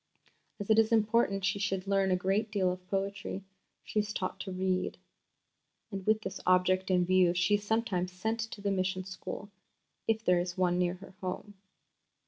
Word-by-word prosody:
As 205 +1 -1
it 220 - +6
is 225 0 +3
important 215 -3 +3
she 200 - +1
should 195 -2 -1
learn 195 -1 +2
a 185 - +4
great 195 +4 0
deal 195 -3 +1
of 180 0 -7
poetry, 195 0 -3 0.4
she 215 - -1
is 210 0 -1
taught 185 -1 -3
to 190 +1 -5
read 185 0 -1 0.9
(and 195 -1 -4
with 215 0 +4
this 190 -2 -5
object 185 +1 +3
in 180 -1 +3
view 180 -1 +4
she 175 +3 +2
is 205 0 +2
sometimes 205 -5 0
sent 220 +5 -2
to 225 -2 -5
the 200 0 0
mission 185 -1 0
school, 190 +2 -7 0.6
if 220 0 +1
there 180 -1 +4
is 175 +1 -3
one 180 -1 +2
near 180 0 +1
her 190 +1 -13
home). 185 +2 -4
190 Hz, 185 wpm, -31 LUFS, 185-205 Hz, 0.9 s, it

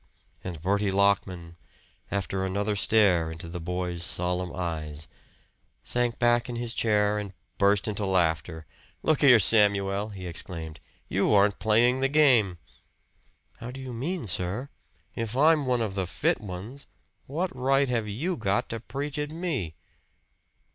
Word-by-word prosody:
And 90 -4 -6
Bertie 100 +2 +1
Lockman, 95 -4 0 0.5
after 95 -1 -2
another 100 +2 -1
stare 100 -6 +4
into 80 +1 -8
the 90 +1 -6
boy's 90 0 -3
solemn 90 0 0
eyes, 80 -4 -4 0.8
sank 120 -1 0
back 120 +1 +2
in 120 - -4
his 120 -1 -2
chair 105 -2 +1
and 100 -2 -7 0.2
burst 100 +1 +3
into 105 -1 -2
laughter. 80 -3 0 0.4
"Look 155 -2 +2
here, 130 -5 +8
Samuel!" 100 -1 +3
he 95 -3 -8
exclaimed. 85 -2 -6 0.3
"You - - +1
aren't 100 0 +3
playing 120 +4 +3
the 135 - +2
game!" 125 -11 +4 1.0
"How 120 - -7
do 130 +2 -8
you 130 -2 -7
mean, 155 +7 -3
sir?" 95 +8 -2 0.4
"If 115 +1 -4
I'm 150 -1 +4
one 125 -2 +1
of 110 -4 -2
the 95 -2 -2
fit 85 - 0
ones, 105 +8 -8 0.4
what 165 +4 -3
right 135 +2 +2
have 115 -4 -1
you 155 - -2
got 100 +1 0
to 115 - -4
preach 140 +5 -5
at 150 0 -2
me?" 150 - -3
105 Hz, 145 wpm, -27 LUFS, 90-125 Hz, 1.0 s, here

